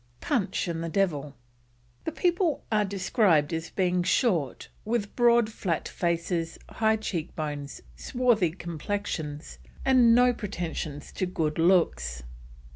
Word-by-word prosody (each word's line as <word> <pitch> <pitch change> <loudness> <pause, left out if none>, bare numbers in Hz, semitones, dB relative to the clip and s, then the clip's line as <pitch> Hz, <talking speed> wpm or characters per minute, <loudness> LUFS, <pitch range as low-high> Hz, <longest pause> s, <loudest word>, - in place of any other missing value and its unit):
PUNCH 220 -9 -1
AND 165 -1 -3
THE 165 - -3
DEVIL. 150 -6 -1 0.7
The - - -1
people 350 -1 +1
are 215 -1 +3
described 190 - +2
as 165 0 -3
being 180 -1 +1
short, 175 - +1 0.2
with 215 -2 -2
broad 235 -2 +5
flat 175 -6 -2
faces, 170 -1 -1
high 220 0 +2
cheek 180 -7 -4
bones, 145 -2 -5
swarthy 240 -8 +2
complexions, 160 -2 -5 0.3
and 245 -3 +6
no 250 0 +5
pretensions 165 -8 -5
to 185 - -2
good 160 -3 -2
looks. 65 - +2
180 Hz, 120 wpm, -27 LUFS, 160-220 Hz, 0.7 s, and